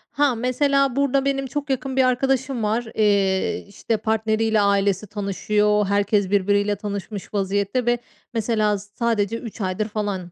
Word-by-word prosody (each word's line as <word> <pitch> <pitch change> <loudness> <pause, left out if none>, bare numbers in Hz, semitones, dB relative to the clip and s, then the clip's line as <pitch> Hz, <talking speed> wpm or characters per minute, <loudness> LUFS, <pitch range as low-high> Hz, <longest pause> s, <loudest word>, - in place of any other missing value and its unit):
Ha, 285 -3 +3
mesela 270 +2 +1
burada 275 -1 +1
benim 270 -1 0
çok 290 +2 -4
yakın 265 0 -2
bir 260 - +5
arkadaşım 260 -1 +1
var, 225 +3 0
eee, 200 -3 +1
işte, 220 +2 -2
partneriyle 220 0 +1
ailesi 200 0 +1
tanışıyor, 210 +1 +1
herkes 200 -1 +1
birbiriyle 205 +1 +2
tanışmış 205 0 -6
vaziyette 200 +4 0
ve 240 0 +2 0.4
mesela 215 -2 +1
s 205 +1 -12
sadece 230 -2 0
3 230 -2 -8
aydır 190 +3 -1
falan, 205 -5 -3
215 Hz, 145 wpm, -22 LUFS, 200-250 Hz, 0.4 s, bir